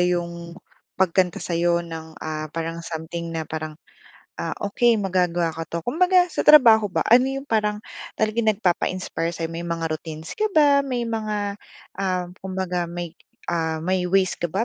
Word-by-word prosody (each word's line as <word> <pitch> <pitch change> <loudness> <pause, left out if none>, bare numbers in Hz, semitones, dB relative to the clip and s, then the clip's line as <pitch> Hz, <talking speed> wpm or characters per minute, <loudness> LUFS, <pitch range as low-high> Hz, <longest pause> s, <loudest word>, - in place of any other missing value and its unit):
yung 170 -1 -1 0.4
pagkanta 185 -1 +2
sa'yo 170 0 0
ng, 160 -1 -8
ah, 155 0 -4
parang 165 +2 -4
something 165 0 -5
na 165 -1 -3
parang, 155 0 -5 0.6
"Ah, - - -3
okey 230 +3 +3
magagawa 180 -4 0
ka 165 +1 -6
'to." 170 -1 -4
Kumbaga 360 - +4
sa - - -1
trabaho 230 -8 +7
ba, 165 -4 -1
ano 250 +3 +5
yung 270 - -5
parang 210 -4 0 0.3
talagang 220 +1 +1
nagpapa-inspire 185 -3 0
sa'yo? 165 -1 -4
May 165 - -4
mga 165 -2 -2
routines 155 0 -6
ka 430 0 0
ba? 290 -2 +6
May 255 -4 -2
mga, 210 -3 -3 0.4
ah, 180 -2 -1
kumbaga 185 -2 -2
may, 175 -1 -5 0.3
ah, 160 -1 -1
may 185 0 0
ways 190 0 +2
ka 175 - 0
ba 195 +8 -1
180 Hz, 160 wpm, -23 LUFS, 165-210 Hz, 0.6 s, trabaho